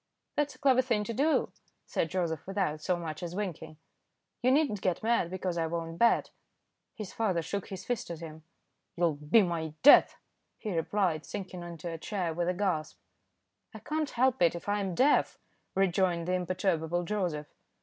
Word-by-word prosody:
"That's 290 -1 0
a - - -18
clever 260 -2 +4
thing 235 -5 0
to 230 - -4
do," 295 +7 +2 0.3
said 165 - -1
Joseph, 170 -3 -2
without 190 -6 -1
so 180 +2 0
much 160 -3 -5
as 175 0 -5
winking. 180 -6 -5 0.6
"You 250 - +3
need 295 +4 +4
not 210 -3 -4
get 185 +1 -1
mad 230 -6 +2
because 185 -1 -2
I 165 - 0
won't 165 0 -4
bet." 235 0 +3 0.6
His 210 -4 -7
father 190 -7 0
shook 200 +3 -4
his 190 -2 -7
fist 245 -2 -2
at 170 -2 -5
him. 160 -1 -9 0.5
"You'll 170 -2 +2
be 150 +9 +4
my 160 -3 -3
death," 290 - +8 0.4
he 210 -5 -4
replied, 165 -1 0
sinking 185 -3 -6
into 170 -1 -7
a 165 -1 -5
chair 180 -3 -2
with 175 +2 -1
a - - +1
gasp. 180 -5 -1 0.8
"I - - -5
can't 305 -1 -2
help 255 -1 +1
it 170 -1 +4
if 170 - -8
I 205 0 +1
am 190 -3 -2
deaf," 280 +7 +3 0.4
rejoined 180 -2 +1
the 180 - +1
imperturbable 175 -2 0
Joseph. 175 -6 -2
180 Hz, 180 wpm, -30 LUFS, 165-210 Hz, 0.8 s, death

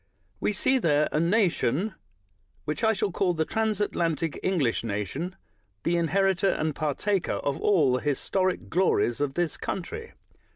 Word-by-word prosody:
"We - - +1
see 260 +6 +2
there 150 -7 +3
a 150 - +1
nation 180 - +1 0.7
which 150 +9 -3
I 220 - +5
shall 200 -1 -1
call 180 0 +1
the 160 0 0
transatlantic 180 -8 -1
English 155 -14 +1
nation 115 - -3 0.2
— 100 -2 -44
the 170 - +1
inheritor 190 +3 +2
and 155 -3 0
partaker 160 +7 -1
of 140 -1 -2
all 160 -11 +4
the 125 - 0
historic 185 +6 0
glories 165 -9 +1
of 140 -2 -1
this 175 -2 -1
country. 325 - -5
170 Hz, 150 wpm, -27 LUFS, 145-195 Hz, 0.7 s, I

